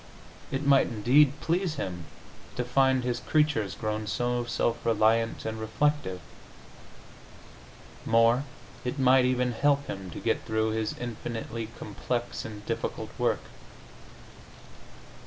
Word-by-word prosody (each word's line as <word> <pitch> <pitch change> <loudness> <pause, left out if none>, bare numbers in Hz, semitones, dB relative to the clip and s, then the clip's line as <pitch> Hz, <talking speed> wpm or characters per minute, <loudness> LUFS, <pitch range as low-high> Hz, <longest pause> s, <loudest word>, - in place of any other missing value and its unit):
It 135 +2 -2
might, 140 -1 +5
indeed, 130 +5 +4
please 170 -1 0
Him 90 - -4 0.5
to 125 - -1
find 130 +1 +3
His 120 -1 -1
creatures 145 - +1
grown 110 -1 -3
so 120 +3 0
self 120 0 -1
reliant 115 0 +2
and 110 0 -3
reflective. 110 -3 0 1.8
More, 115 +3 +4 0.4
it 125 +3 -3
might 130 -1 +5
even 125 -1 +1
help 140 +4 +2
Him 95 -1 -6
to - - -7
get - - 0
through 110 0 0
His 110 -1 -2
infinitely 115 -1 -5
complex 120 +3 -3
and 105 -2 -8
difficult - - -3
work. - - +1
120 Hz, 120 wpm, -28 LUFS, 110-130 Hz, 1.8 s, might